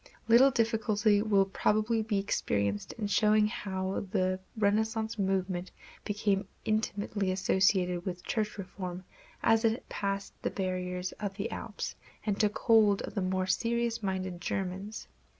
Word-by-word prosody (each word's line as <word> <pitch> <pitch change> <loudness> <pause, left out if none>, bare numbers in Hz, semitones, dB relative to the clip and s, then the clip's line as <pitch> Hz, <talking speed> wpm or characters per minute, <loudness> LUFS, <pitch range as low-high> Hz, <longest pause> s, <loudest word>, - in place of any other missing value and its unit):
Little 240 +4 +7
difficulty 220 -3 +2
will 200 -3 +3
probably 215 +3 +1
be 215 -1 -1
experienced 100 - -1
in 220 - -4
showing 210 +1 +4
how 195 -3 -3
the 185 -2 +1 0.2
Renaissance 220 +1 +1
movement 185 -2 0 0.4
became 205 -2 0 0.2
intimately 205 -2 0
associated 185 -1 +2
with 180 -1 -5
church 215 -1 -1
reform 185 -1 -6 0.4
as 225 0 +4
it 225 +2 +1
passed 195 0 -3
the - - 0
barriers 180 -1 -3
of 200 -2 -3
the 200 +2 -3
Alps - - -5 0.3
and 205 -2 0
took 210 -1 +2
hold 215 -4 +4
of - - -6
the 200 - -1
more 185 0 0
serious 235 +3 0
minded 185 -3 -3
Germans. 195 +3 -4
200 Hz, 135 wpm, -30 LUFS, 185-220 Hz, 0.4 s, Little